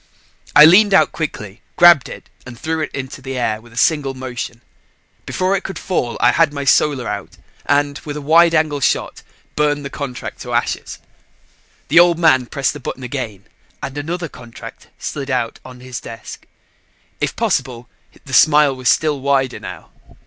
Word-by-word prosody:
I 150 Hz, -, +10 dB
leaned 195 Hz, +4 st, +6 dB
out -, -, +4 dB
quickly, 105 Hz, -, -6 dB
grabbed 175 Hz, -6 st, +6 dB
it -, -, -10 dB, 0.2 s
and 120 Hz, -1 st, -11 dB
threw 160 Hz, +2 st, -2 dB
it 155 Hz, -, -2 dB
into 135 Hz, 0 st, -7 dB
the 135 Hz, 0 st, -6 dB
air 110 Hz, -3 st, -1 dB
with 120 Hz, 0 st, -18 dB
a 115 Hz, -, -15 dB
single 140 Hz, -2 st, +1 dB
motion. 125 Hz, -2 st, -6 dB, 0.7 s
Before 185 Hz, +1 st, 0 dB
it 195 Hz, -, -3 dB
could 195 Hz, -, -6 dB
fall, 130 Hz, -11 st, -2 dB
I -, -, +4 dB
had 165 Hz, -3 st, +3 dB
my 140 Hz, -1 st, -5 dB
Solar 135 Hz, -2 st, +2 dB
out -, -, -6 dB, 0.3 s
and, 145 Hz, 0 st, +1 dB
with 150 Hz, -1 st, -7 dB
a -, -, -5 dB
wide 165 Hz, +3 st, +4 dB
angle 155 Hz, -2 st, +1 dB
shot, 135 Hz, -, -1 dB, 0.3 s
burned 145 Hz, -1 st, 0 dB
the 140 Hz, -, -6 dB
contract 135 Hz, -4 st, -6 dB
to -, -, -6 dB
ashes. -, -, -2 dB, 0.9 s
The 165 Hz, +4 st, +6 dB
Old 175 Hz, -1 st, +5 dB
Man 130 Hz, -7 st, +3 dB
pressed 135 Hz, -2 st, -1 dB
the 145 Hz, -, -8 dB
button 130 Hz, 0 st, -6 dB
again 120 Hz, -6 st, -5 dB, 0.4 s
and 135 Hz, -, -5 dB
another 165 Hz, +4 st, -4 dB
contract 120 Hz, -5 st, -12 dB
slid 140 Hz, -2 st, -5 dB
out 125 Hz, -3 st, -2 dB
on 125 Hz, -1 st, -12 dB
his 130 Hz, -1 st, -7 dB
desk. 115 Hz, -1 st, -10 dB, 0.7 s
If -, -, -2 dB
possible, 125 Hz, -1 st, -2 dB, 0.4 s
the 130 Hz, -, -10 dB
smile 150 Hz, -2 st, +5 dB
was 130 Hz, -1 st, 0 dB
still 150 Hz, -3 st, +1 dB
wider 135 Hz, -2 st, 0 dB
now. -, -, -10 dB
140 Hz, 175 wpm, -18 LUFS, 125-155 Hz, 0.9 s, I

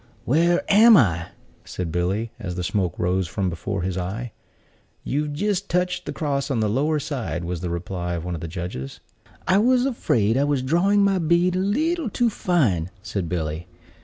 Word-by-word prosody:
"Where 170 Hz, +7 st, +3 dB
am 220 Hz, +2 st, +7 dB
I?" 85 Hz, -, +2 dB, 0.4 s
said 90 Hz, -3 st, -5 dB
Billy, 95 Hz, +7 st, -1 dB
as 95 Hz, -6 st, -5 dB
the 90 Hz, -, -3 dB
smoke 90 Hz, -1 st, -1 dB
rose 90 Hz, +1 st, 0 dB
from 95 Hz, +1 st, -2 dB
before 90 Hz, +3 st, -3 dB
his 95 Hz, 0 st, -2 dB
eye. 105 Hz, +7 st, -4 dB, 0.7 s
"You've 150 Hz, +2 st, -1 dB
jist 200 Hz, +4 st, -1 dB
touched 180 Hz, 0 st, -1 dB
the -, -, -2 dB
cross 140 Hz, -2 st, -2 dB
on 130 Hz, -5 st, 0 dB
the 110 Hz, -, +1 dB
lower 145 Hz, +9 st, +1 dB
side," 130 Hz, -, -3 dB
was 85 Hz, -1 st, -4 dB
the 90 Hz, -, -3 dB
reply 90 Hz, 0 st, -3 dB
of 85 Hz, 0 st, -5 dB
one 90 Hz, -, -3 dB
of 80 Hz, -, -5 dB
the 85 Hz, -, -4 dB
judges. 85 Hz, -6 st, -6 dB, 0.5 s
"I 190 Hz, +1 st, +4 dB
was 250 Hz, +3 st, +3 dB
afraid 120 Hz, -, +1 dB
I 140 Hz, -, +3 dB
was 145 Hz, -3 st, 0 dB
drawing 190 Hz, +9 st, +3 dB
my 195 Hz, -1 st, +2 dB
bead 170 Hz, +2 st, +2 dB
a -, -, +1 dB
leetle 300 Hz, -, 0 dB
too 235 Hz, +3 st, +1 dB
fine," 120 Hz, -, +1 dB
said 95 Hz, -5 st, -3 dB
Billy. 80 Hz, -1 st, -3 dB
120 Hz, 190 wpm, -23 LUFS, -, 0.7 s, am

